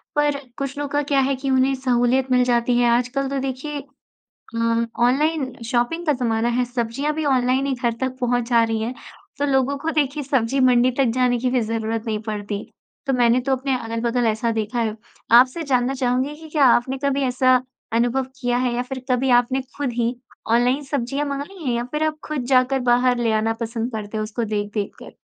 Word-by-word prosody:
पर 295 -1 +2 0.2
कुछ 275 0 -4
लोग 290 -1 -4
का 290 - +1
क्या 275 - +4
है 270 +1 +1
कि 270 +1 -4
उन्हें 260 +1 +3
सहूलियत 255 0 +1
मिल 250 0 +4
जाती 240 0 +2
है, 240 -1 +4
आजकल 250 +3 0
तो 275 0 -2
देखिए 270 +3 -4 0.8
अ, 230 0 +1 0.2
ऑनलाइन 275 +2 +1
शॉपिंग 240 +9 0
का 300 - +4
ज़माना 235 -2 0
है, 245 +1 +1
सब्ज़ियाँ 245 +4 -2
भी 315 0 -2
ऑनलाइन 260 -1 +2
ही 275 - 0
घर 245 -2 -1
तक 260 -1 -2
पहुँचा 245 0 +1 0.2
जा 230 - +6
रही 225 -1 -1
हैं, 235 +3 -3 0.4
तो 285 - 0
लोगों 270 0 +1
को 320 +3 -2
देखिए 295 -1 0
सब्ज़ी 265 -1 0
मंडी 250 -1 +4
तक 275 - +4
जाने 250 -1 +2
की 250 +1 0
भी 250 0 +2
ज़रूरत 225 0 -2
नहीं 215 -1 -1
पड़ती। 205 -1 -4 0.4
तो 270 - +1
मैंने 245 0 +3
तो 270 - +1
अपने 265 +1 -1
अगल-बगल 230 +1 -1
ऐसा 220 +1 0
देखा 225 +2 -2
है। 220 -2 -1 0.4
आपसे 255 +7 +6
जानना 260 -2 +1
चाहूँगी 255 +2 0
कि 320 +1 -12
क्या 295 -3 +4
आपने 255 +2 +3
कभी 280 0 +1
ऐसा 255 0 +3 0.3
अनुभव 240 +3 +1
किया 245 -1 +1
है, 250 -1 0
या 245 - 0
फिर 255 0 -7
कभी 255 +1 +2
आपने 245 +2 +3 0.2
खुद 285 -4 -2
ही 235 +1 0 0.4
ऑनलाइन 250 +4 +3
सब्ज़ियाँ 275 +1 -2
मँगाई 285 +6 -6
हैं, 250 -3 0
या 235 - -2
फिर 300 +1 0
आप 310 0 -2
खुद 300 -5 -3
जाकर 255 +1 +3
बाहर 245 0 +3
ले 235 -2 +1
आना 220 +1 +1
पसंद 230 +1 -3
करते 215 -1 -5
हो - - -1
उसको 225 +2 -3
देख-देख 205 -1 -3
कर? - - -12
250 Hz, 205 wpm, -22 LUFS, 235-275 Hz, 0.8 s, जा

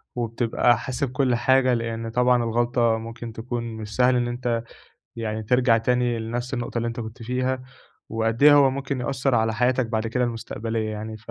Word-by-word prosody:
وبتبقى 120 0 +1
حاسب 130 +2 -3
كُل 125 -2 +1
حاجة 130 +1 +3
لإن 115 -1 -3
طبعًا 125 0 +3
الغلطة 120 0 +1
ممكن 115 0 -7
تكون 120 +1 -4
مش 110 -2 -7
سهل 125 0 +4
إن 120 -1 +1
أنت 120 -1 -2 0.5
يعني 110 -1 -3
ترجَع 125 +1 +3
تاني 120 0 +1
لنفس 120 +3 -4
النقطة 120 -1 -3
اللي 115 0 -1
أنت 115 +1 -5
كنت 110 +1 -8
فيها، 130 +2 -1 0.5
وقدّ 115 +3 -1
إيه 150 0 +9
هو 140 -2 +6
ممكن 135 -1 -3
يأثّر 135 0 0
على 110 -1 +2
حياتك 125 +2 +1
بعد 110 0 -2
كده 125 +2 0
المُستقبلية 115 -1 -3
يعني، 110 +1 -6
ف 115 +2 -12
120 Hz, 180 wpm, -24 LUFS, 115-125 Hz, 0.5 s, إيه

